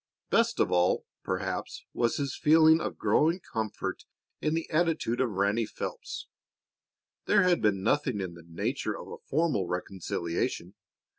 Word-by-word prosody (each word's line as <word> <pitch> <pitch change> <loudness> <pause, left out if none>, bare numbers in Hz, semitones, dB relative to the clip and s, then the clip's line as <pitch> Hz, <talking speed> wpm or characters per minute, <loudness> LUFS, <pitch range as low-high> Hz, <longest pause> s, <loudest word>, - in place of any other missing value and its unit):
Best 230 0 +3
of - - +2
all, 90 0 +2 0.2
perhaps, - - -3
was 120 +6 +1
his 140 -3 -2
feeling 160 +1 +6
of - - -4
growing 165 +4 +2
comfort 110 - -4 0.4
in 155 +1 +1
the 165 - -2
attitude 155 -7 +1
of 130 - +2
Ranny 100 +3 +1
Phelps. - - -6 1.0
There 200 - +4
had 180 -1 +3
been 100 -3 +2
nothing 130 -1 +1
in 95 -3 -4
the 85 - -12
nature 85 - -2
of - - -9
a - - -7
formal 145 - 0
reconciliation. 90 0 -3
125 Hz, 145 wpm, -29 LUFS, 95-165 Hz, 1.0 s, feeling